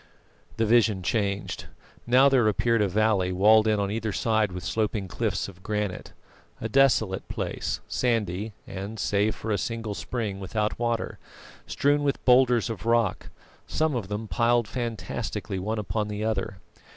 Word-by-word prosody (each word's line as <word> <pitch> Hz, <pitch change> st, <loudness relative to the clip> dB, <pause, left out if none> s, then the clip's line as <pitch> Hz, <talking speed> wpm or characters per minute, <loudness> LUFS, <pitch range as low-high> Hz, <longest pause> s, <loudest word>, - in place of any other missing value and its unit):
The 115 Hz, -, +2 dB
vision 110 Hz, -4 st, +3 dB
changed. 100 Hz, -1 st, -1 dB, 0.4 s
Now 130 Hz, +3 st, +6 dB
there 130 Hz, -5 st, +4 dB
appeared 115 Hz, +2 st, +2 dB
a 105 Hz, -, +3 dB
valley 100 Hz, -2 st, +2 dB
walled 105 Hz, +4 st, +5 dB
in 105 Hz, -1 st, +2 dB
on 100 Hz, -1 st, -1 dB
either 110 Hz, 0 st, -2 dB
side 110 Hz, -1 st, +1 dB
with 90 Hz, 0 st, -6 dB
sloping 105 Hz, -3 st, -1 dB
cliffs -, -, -2 dB
of 95 Hz, -2 st, -13 dB
granite; 105 Hz, -2 st, -3 dB, 0.5 s
a 110 Hz, -, -3 dB
desolate 110 Hz, -6 st, +2 dB
place, -, -, -3 dB
sandy 110 Hz, -4 st, -1 dB
and, 100 Hz, +4 st, -6 dB
save 105 Hz, +1 st, +1 dB
for 110 Hz, -, -5 dB
a 100 Hz, -, +1 dB
single 115 Hz, -1 st, -3 dB
spring, 105 Hz, -3 st, -4 dB
without 105 Hz, +3 st, -2 dB
water, 120 Hz, -1 st, -2 dB, 0.5 s
strewn 145 Hz, +1 st, +2 dB
with 140 Hz, -1 st, -1 dB
boulders 125 Hz, -2 st, +5 dB
of 115 Hz, 0 st, -5 dB
rock, 115 Hz, -4 st, +1 dB, 0.4 s
some 155 Hz, -1 st, 0 dB
of 110 Hz, -6 st, -3 dB
them 105 Hz, +2 st, -4 dB
piled 120 Hz, 0 st, +2 dB
fantastically 115 Hz, -5 st, -4 dB
one 110 Hz, +4 st, -2 dB
upon 105 Hz, +1 st, -2 dB
the 105 Hz, 0 st, -4 dB
other. 100 Hz, -3 st, -2 dB
110 Hz, 155 wpm, -26 LUFS, 100-115 Hz, 0.5 s, Now